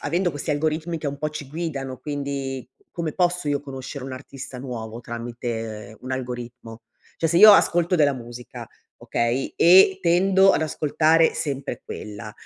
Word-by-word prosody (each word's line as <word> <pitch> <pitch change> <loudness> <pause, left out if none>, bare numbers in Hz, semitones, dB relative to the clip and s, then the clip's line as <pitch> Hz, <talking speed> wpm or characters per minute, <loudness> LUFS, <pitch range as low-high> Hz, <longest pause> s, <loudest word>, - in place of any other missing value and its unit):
avendo 175 +4 0
questi 145 +1 -5
algoritmi 155 +3 -1
che 155 - -5
un 140 0 -4
po' 155 - -1
ci 150 -2 -7
guidano. 140 -5 -4
Quindi 140 -2 -4 0.2
come 165 -4 -4
posso 180 -2 0
io 145 -1 0
conoscere 135 0 -8
un 135 - -6
artista 135 0 -9
nuovo 120 -3 -6
tramite 115 -2 -6
un 130 - -8
algoritmo? 120 -2 -6 0.3
Cioè 165 - 0
se 170 - +1
io 215 +3 +10
ascolto 175 -1 +3
della 145 -3 +3
musica, 120 -1 -9 0.3
okay, 120 +3 -1
e 190 +2 +7
tendo 190 +3 +4
ad - - +1
ascoltare 155 +2 +2
sempre 140 -5 -4
quella, 105 0 -8
140 Hz, 155 wpm, -23 LUFS, 125-165 Hz, 0.3 s, io